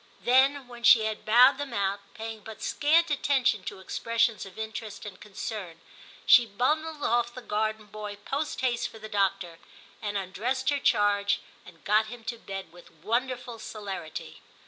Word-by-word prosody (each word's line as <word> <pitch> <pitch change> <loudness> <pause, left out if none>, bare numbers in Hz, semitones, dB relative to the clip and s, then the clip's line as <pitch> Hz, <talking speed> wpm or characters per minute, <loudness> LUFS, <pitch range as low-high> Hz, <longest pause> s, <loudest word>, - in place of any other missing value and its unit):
* - - -29
Then, 265 +2 +4
when 240 -1 -11
she 230 -1 +7
had 220 -1 -3
bowed 250 +5 +6
them 280 -4 -4
out, 200 0 0 0.2
paying 225 0 -6
but 220 +1 -10
scant 320 +2 +3
attention 265 -7 +2
to - - -5
expressions 230 +2 0
of 190 - -14
interest 220 -1 -6
and 205 -3 -9
concern, 195 -4 -6 0.5
she 240 -2 +7
bundled 300 +8 -1
off 240 +1 +1
the 255 - -7
garden 215 0 -1
boy 210 0 -7
post 290 +1 -2
haste 245 -2 0
for - - -12
the 215 0 -8
doctor, 195 -5 -1 0.4
and 205 -2 -2
undressed 235 +9 -1
her 285 - 0
charge 205 -4 +2 0.3
and 170 -2 -16
got 215 +2 +3
him 235 +1 -9
to 235 +1 -5
bed 195 -5 -7
with 175 0 -15
wonderful 240 +6 -3
celerity. 200 -8 -7
220 Hz, 170 wpm, -28 LUFS, 205-250 Hz, 0.5 s, she